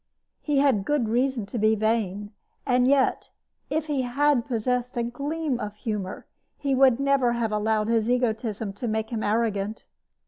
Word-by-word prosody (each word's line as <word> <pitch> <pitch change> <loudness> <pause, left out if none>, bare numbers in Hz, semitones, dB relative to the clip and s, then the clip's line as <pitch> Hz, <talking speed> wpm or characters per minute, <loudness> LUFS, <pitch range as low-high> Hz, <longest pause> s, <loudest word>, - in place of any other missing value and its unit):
He 295 -2 0
had 270 -8 +3
good 290 -1 0
reason 245 -1 0
to 225 +4 -5
be 215 +1 +3
vain, 210 -2 -1 0.3
and 250 -1 +3
yet, 270 -1 +2 0.4
if 310 0 -1
he 290 -3 -1
had 255 0 +1
possessed 250 +1 -1
a 235 - +1
gleam 280 +3 -2
of 210 -2 -5
humor, 210 -3 -4 0.3
he 275 -1 -1
would 260 -2 +4
never 275 -3 +2
have 235 -2 -1
allowed 215 0 0
his 230 0 +1
egoism 225 -4 -1
to 235 +5 -5
make 220 +1 -2
him 225 -2 -2
arrogant. 215 -1 -1
235 Hz, 165 wpm, -25 LUFS, 215-265 Hz, 0.4 s, would